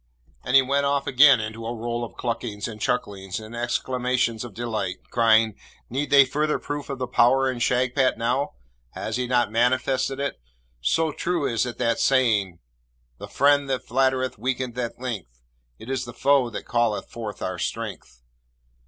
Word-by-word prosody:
and 125 - 0
he 135 - +8
went 140 +2 +1
off 140 0 +1
again 135 -1 +6
into 110 +1 -5
a 115 +1 -4
roll 120 +1 -3
of 120 - -7
cluckings 115 -4 -3
and 110 -2 -9
chucklings 100 -6 -2
and 110 +2 -10
exclamations 120 -1 -1
of 120 -5 -9
delight, 110 -6 -2 0.2
crying, 110 -2 +4 0.4
'Need 140 +4 -2
they 140 -1 +7
further 150 +3 0
proof 145 0 -5
of 140 - -3
the 130 - -2
power 130 +2 +3
in 125 - -6
Shagpat 125 +2 +2
now? 125 +5 -1 0.4
Has 110 +2 -3
he 125 -1 -1
not 120 -3 +2
manifested 130 +3 +1
it? 140 - -3 0.4
So 160 - +1
true 170 -1 -1
is 115 -1 0
that 120 -1 -1
saying 110 -9 +2 0.6
"The - - -7
friend 145 0 +3
that 130 -3 -2
flattereth 130 -1 0
weakeneth 125 0 -2
at 120 -1 -4
length; 105 - -6 0.4
It 110 - -12
is 130 -1 -2
the 120 - -9
foe 140 -2 +3
that 110 - -7
calleth 120 -3 0
forth 110 -3 -6
our - - -3
strength." - - -5
125 Hz, 170 wpm, -24 LUFS, 115-135 Hz, 0.6 s, he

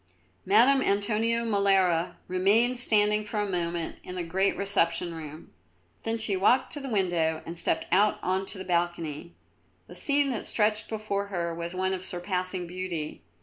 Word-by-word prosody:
Madame 245 +7 +5
Antonio 225 +2 +1
Molara 195 -5 +2
remained 215 +7 +3
standing 210 -3 +3
for 210 0 -4
a 205 - 0
moment 170 -3 -3
in 180 - -7
the 180 - -3
great 190 +4 0
reception 175 -4 0
room. 155 -1 -9 0.5
Then 225 0 0
she 220 -3 -1
walked 240 +7 +3
to 295 - -3
the 270 -1 -6
window 175 -7 0
and 165 - -6
stepped 170 - 0
out 205 +3 +4
on 190 +1 -1
to - - +1
the 190 - -6
balcony. 170 -3 -2 0.5
The - - -13
scene 280 -2 +1
which 225 - -5
stretched 215 0 +1
before 210 -2 -3
her 170 -4 -3
was 170 +1 -5
one 190 +1 0
of 185 -1 -4
surpassing 185 0 -3
beauty. 175 -3 -5
190 Hz, 165 wpm, -27 LUFS, 175-215 Hz, 0.5 s, Madame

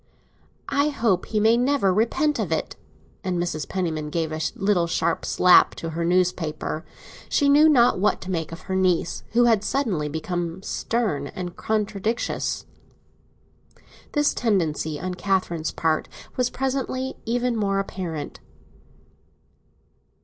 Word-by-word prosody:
"I 280 +1 +2
hope 225 -10 0
he 215 - 0
may 225 +2 +4
never 250 -6 +2
repent 295 - +1
of - - -2
it!" - - -1 0.5
And 185 -1 -1
Mrs. 170 -4 -2
Penniman 160 -5 -2
gave 160 0 -2
a 155 0 -3
little 195 -4 +1
sharp 170 - 0
slap 180 0 +5
to 165 - -5
her 165 +1 -2
newspaper. 175 -3 0 0.5
She 285 - +2
knew 295 +3 +6
not 245 -8 +4
what 205 - +2
to 190 - -5
make 165 -3 -2
of 165 - -8
her 190 - -4
niece, 180 -2 +1
who 240 +1 +5
had 225 -4 +4
suddenly 210 - -1
become 170 +3 -3
stern 200 -15 -1
and 180 +1 -6
contradictious. 215 +1 -2 1.5
This 295 -1 +2
tendency 160 -9 0
on 185 0 -3
Catherine's 180 -4 -1
part 160 -1 0 0.3
was 250 -1 +1
presently 265 0 -2
even 245 +1 0
more 200 -3 0
apparent. 180 -6 -4
190 Hz, 135 wpm, -24 LUFS, 170-235 Hz, 1.5 s, knew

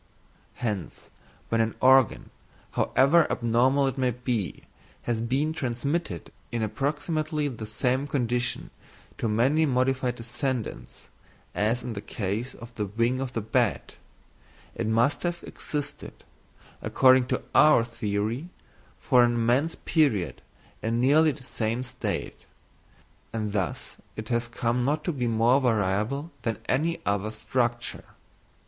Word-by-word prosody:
Hence, 105 -9 -4 0.4
when 115 0 +2
an 115 0 0
organ, 130 -3 +4 0.4
however 145 +6 +3
abnormal 130 +4 +3
it 135 0 -2
may 130 -1 +2
be, 120 -5 -3 0.4
has 115 -2 -1
been 135 +7 0
transmitted 135 - -3 0.2
in 115 -1 -1
approximately 150 - -1
the 115 -5 -6
same 125 +6 0
condition 125 -3 -1 0.5
to 115 - 0
many 135 +9 +3
modified 130 -1 +1
descendants, 120 - -4 0.4
as 115 +4 0
in 125 - -4
the 100 - -5
case 105 +5 -3
of 115 +1 -11
the 105 -3 -3
wing 115 +5 0
of 130 -1 -4
the 115 - -1
bat, 110 - 0 0.8
it - - -3
must 115 +6 +2
have 175 -1 -2
existed, 145 -2 -6 0.6
according 130 -1 +5
to - - -1
our 150 -6 +6
theory, 115 +5 -2 0.5
for 125 -4 +4
an 120 0 +2
immense 120 +7 +2
period 140 - +1 0.4
in 115 +1 0
nearly 150 +5 +5
the 140 -2 -8
same 115 -1 -2
state; 125 - -5 0.8
and 105 -2 -3
thus 95 -4 -3 0.2
it 110 0 -7
has 120 -1 0
come 120 +1 -1
not 145 +5 0
to 175 - 0
be 125 -4 -1
more 115 +4 +3
variable 115 - 0
than 115 -3 -2
any 160 +6 +1
other 100 +1 0
structure. 120 +2 -2
120 Hz, 130 wpm, -27 LUFS, 115-135 Hz, 0.8 s, our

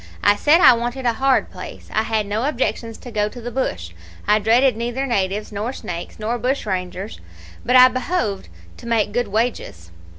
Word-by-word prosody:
I 205 - +5
said 305 +10 +4
I 255 - +9
wanted 240 +2 -3
a 235 - +3
hard 265 +2 +1
place. - - -10
I 220 - +2
had 220 -1 -1
no 210 +4 -2
objections 235 -5 -2
to 245 - -11
go 210 -1 0
to 245 - -11
the 245 +1 -6
bush 85 - -3 0.4
I 210 +1 +4
dreaded 235 +4 +3
neither 240 +4 -3
natives, 205 -4 -1
nor 210 +4 -3
snakes, 175 -8 -7
nor 225 +3 -2
bushrangers, 200 -6 -3 0.4
but 250 - +1
I 255 0 +9
behoved 255 - -2 0.3
to - - -11
make 220 -3 +1
good 245 -1 0
wages. 195 - -3
230 Hz, 185 wpm, -20 LUFS, 205-250 Hz, 0.4 s, I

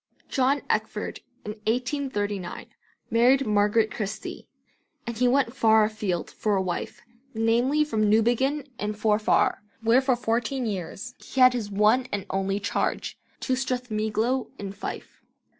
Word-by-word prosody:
John 270 +2 +1
Eckford - - -2 0.3
in 210 - -3 0.2
1839 225 -6 -2 0.5
married 255 +4 +4
Margaret 210 +1 +2
Christie, 210 -1 -5 0.6
and 235 -1 -4
he 250 +2 +2
went 260 -1 +2
far 220 -3 +5
afield 210 -5 -2
for 210 -2 0
a 190 - +1
wife, 180 -2 -4 0.3
namely 240 +7 +2
from 215 -7 +1
Newbiggin 245 +6 +2
in 210 0 -2
Forfar, 210 0 +2 0.2
where 230 +3 +5
for 260 -1 +2
fourteen 240 +2 -1
years 205 +3 -5
he 265 - -6
had 255 0 +8
his 225 -4 -3
one 215 +5 +3
and 205 -1 -2
only 195 +1 0
charge, - - -2 0.2
to 260 - 0
Strathmiglo 245 -1 -1
in 200 -1 -5
Fife. 200 - -7
225 Hz, 135 wpm, -26 LUFS, 210-255 Hz, 0.6 s, had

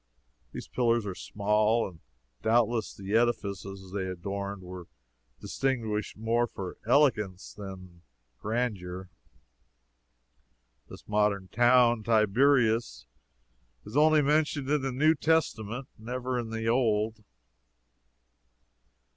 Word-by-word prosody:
These - - -8
pillars 120 -3 +1
are 100 - -3
small, 105 +4 +1
and 90 -4 -13 0.4
doubtless 115 -1 +1
the 100 +1 -6
edifices 100 -5 -1
they 95 -1 -3
adorned 100 +2 -5
were 90 -1 -9 0.5
distinguished 110 -7 -2
more 115 +2 +1
for 95 -5 -7
elegance 110 -9 +2
than 95 -4 -10 0.4
grandeur. 95 -6 -3 1.8
This - - -12
modern 105 -2 +1
town 120 -1 +4
Tiberias 115 - +2 0.8
is 105 - -10
only 155 0 +5
mentioned 145 -1 +1
in 150 -1 +2
the 135 0 -2
New 150 +5 +3
Testament; 135 -6 0
never 125 +2 -3
in 115 -2 -5
the 115 0 -3
Old. 110 -2 +1
110 Hz, 100 wpm, -28 LUFS, 100-125 Hz, 1.8 s, only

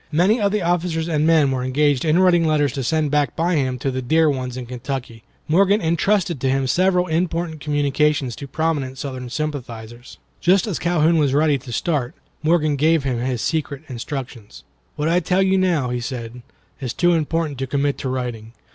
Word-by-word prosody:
Many 190 +9 +3
of 200 -1 +2
the 210 -2 0
officers 170 -1 0
and 155 -2 +1
men 155 -4 +4
were 130 -1 -1
engaged 140 +1 +1
in 155 +1 +3
writing 180 -2 +4
letters 150 -4 +1
to 135 -2 -3
send 155 +2 0
back 145 -4 +1
by 170 +2 0
him 130 -5 0
to 135 +2 -2
the 130 0 -3
dear 155 +4 +3
ones 130 -2 -4
in 125 - -5
Kentucky. 125 -1 -6 0.3
Morgan 195 +6 +3
intrusted 170 - 0
to 135 - +1
him 135 0 +1
several 180 +6 +2
important 165 -1 -2
communications 145 -2 0
to 140 - -7
prominent 145 -3 -2
Southern 130 -3 -6
sympathizers. 120 -5 -6 0.2
Just 185 +2 +3
as 205 -7 -3
Calhoun 170 -1 +2
was 140 -2 +2
ready 150 -2 +3
to 120 - -10
start, 130 0 -1 0.3
Morgan 155 -2 +2
gave 160 +1 +3
him 130 -3 -1
his 125 -1 -2
secret 150 -3 -2
instructions. 125 -3 -7 0.3
"What 150 - -1
I 170 +2 +3
now - - +5
tell 180 +2 +1
you," 185 -8 +2
he 125 - -2
said, 120 -1 -6 0.4
"is 130 -4 -4
too 175 0 +3
important 160 -3 -1
to 135 - -2
commit 140 +1 -1
to 130 - -3
writing. 120 -3 -4
150 Hz, 190 wpm, -21 LUFS, 130-165 Hz, 0.4 s, now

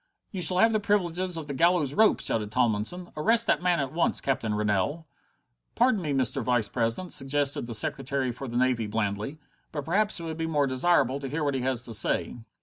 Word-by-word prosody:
"You 190 - -5
shall 180 +2 +1
have 225 +3 +4
the 215 - +2
privileges 185 -3 0
of 160 - -5
the 145 - -5
gallows 165 -1 +2
rope!" 220 +6 +3
shouted 105 -2 -1
Tomlinson. 120 +9 -1
"Arrest 225 +9 +3
that - - +1
man 175 -2 +2
at 135 0 -3
once, 170 - +1
Captain 115 -6 -1
Rennell!" 105 - -1 0.7
"Pardon 240 -4 +2
me, 155 -4 -3
Mr. 130 -2 0
Vice 120 -4 +1
president," 115 - -2
suggested 140 -2 +1
the 115 - -3
Secretary 130 +3 0
for 130 +3 -7
the 120 0 -4
Navy 125 -3 +1
blandly, 105 +5 -3 0.3
"but 145 -3 -5
perhaps 205 +5 +1
it - - -7
would 160 -1 -5
be 165 0 -2
more 150 -3 +1
desirable 135 0 +1
to 135 -1 -6
hear 150 +3 -2
what 145 -1 0
he 130 - -2
has 125 -2 -1
to 120 - -7
say." 110 +3 -1
140 Hz, 210 wpm, -27 LUFS, 120-175 Hz, 0.7 s, have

